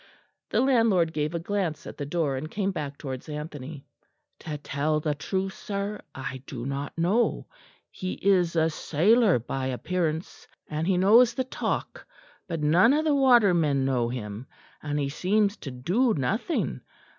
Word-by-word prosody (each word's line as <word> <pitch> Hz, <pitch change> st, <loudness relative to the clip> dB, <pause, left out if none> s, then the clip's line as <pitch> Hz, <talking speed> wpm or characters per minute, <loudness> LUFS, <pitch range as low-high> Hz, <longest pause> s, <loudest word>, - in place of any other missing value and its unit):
The -, -, +2 dB
landlord 225 Hz, -11 st, +3 dB
gave 150 Hz, +2 st, -1 dB
a -, -, 0 dB
glance 175 Hz, -3 st, -2 dB
at -, -, -8 dB
the 145 Hz, -, -5 dB
door, 150 Hz, -3 st, 0 dB
and 145 Hz, +4 st, -5 dB
came 200 Hz, +2 st, -1 dB
back 145 Hz, -5 st, -5 dB
towards 135 Hz, -1 st, -6 dB
Anthony. 150 Hz, -1 st, -7 dB, 0.5 s
"To 150 Hz, -2 st, -5 dB
tell 150 Hz, +1 st, -1 dB
the 150 Hz, -1 st, -1 dB
truth, 190 Hz, +6 st, -3 dB
sir, 200 Hz, +1 st, -4 dB
I 130 Hz, -1 st, -5 dB
do 120 Hz, -2 st, -6 dB
not 140 Hz, +3 st, -4 dB
know. 195 Hz, +8 st, +1 dB, 0.5 s
He 185 Hz, 0 st, -4 dB
is 180 Hz, -4 st, +2 dB
a 160 Hz, 0 st, +3 dB
sailor 200 Hz, -, +3 dB
by 130 Hz, +3 st, -3 dB
appearance, 160 Hz, +6 st, -3 dB, 0.2 s
and 155 Hz, +1 st, -2 dB
he 190 Hz, -2 st, +2 dB
knows 225 Hz, +6 st, +5 dB
the 260 Hz, -, 0 dB
talk; 260 Hz, -, -4 dB, 0.4 s
but 165 Hz, -3 st, -3 dB
none 175 Hz, -, +5 dB
of 310 Hz, +2 st, +1 dB
the 305 Hz, -, +3 dB
watermen 190 Hz, -, +4 dB
know 125 Hz, -3 st, +1 dB
him; 115 Hz, 0 st, -6 dB, 0.3 s
and 145 Hz, -1 st, -3 dB
he 140 Hz, -1 st, 0 dB
seems 200 Hz, +7 st, +1 dB
to 140 Hz, -, -7 dB
do 180 Hz, -, +1 dB
nothing. 205 Hz, -, -1 dB
160 Hz, 160 wpm, -26 LUFS, 140-200 Hz, 0.5 s, knows